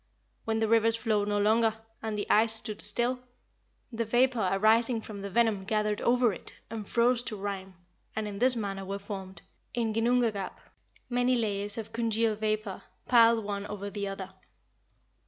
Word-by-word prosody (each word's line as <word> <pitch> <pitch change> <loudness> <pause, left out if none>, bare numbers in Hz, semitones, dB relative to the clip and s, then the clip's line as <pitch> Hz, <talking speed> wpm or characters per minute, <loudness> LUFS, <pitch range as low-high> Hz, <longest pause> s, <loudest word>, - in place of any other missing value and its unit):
When 220 0 0
the 220 0 +1
rivers 225 0 +4
flowed 215 -3 0
no 205 0 0
longer, 220 +2 +3 0.3
and 220 -1 -3
the 205 - -3
ice 220 +1 +4
stood 220 -1 -5
still, 245 +1 0 0.7
the 230 0 -1
vapour 240 -2 +2
arising 225 +4 +4
from 210 -2 -8
the 200 0 -5
venom 220 -1 +2
gathered 210 0 0
over 240 -2 +3
it, - - -10 0.2
and 220 -3 -6
froze 240 +1 +3
to 235 -3 -5
rime, 195 -2 -5 0.4
and 220 -1 -2
in 200 -1 -6
this 250 +1 +5
manner 200 -3 -3
were 195 +1 -4
formed, 195 -2 -8 0.3
in 230 -2 0
Ginnungagap, 225 -3 +1 0.5
many 245 +1 +2
layers 205 -3 -2
of 225 0 -6
congealed 225 -1 0
vapour, 215 -2 -2 0.3
piled 230 -2 +5
one 200 0 -3
over 200 -1 -6
the 200 0 -3
other." 195 -1 -6
220 Hz, 165 wpm, -29 LUFS, 205-230 Hz, 0.7 s, this